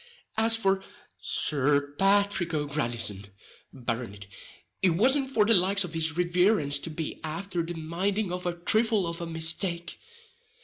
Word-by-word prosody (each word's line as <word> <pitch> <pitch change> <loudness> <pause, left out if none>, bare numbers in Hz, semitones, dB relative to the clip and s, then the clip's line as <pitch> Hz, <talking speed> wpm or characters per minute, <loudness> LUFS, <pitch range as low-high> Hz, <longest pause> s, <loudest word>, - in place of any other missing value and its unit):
As 225 +1 +4
for 195 -3 0 0.4
Sir 145 0 +3
Pathrick 195 -4 +2
O'Grandison, 120 -9 -2 0.4
Barronitt, 115 -5 -5 0.6
it 180 -3 +3
wasn't 265 +7 +3
for 220 -6 +2
the 230 - +4
likes 195 +1 +4
of 175 -2 -7
his 160 0 -1
riverence 180 -4 +2
to 165 - -7
be 160 0 -5
afther 170 +3 -3
the 170 +1 -5
minding 180 +5 -2
of 180 0 -4
a 175 - -1
thrifle 215 +3 +1
of 170 0 -4
a 170 - -4
mistake. 165 +2 -2
170 Hz, 140 wpm, -27 LUFS, 155-200 Hz, 0.6 s, As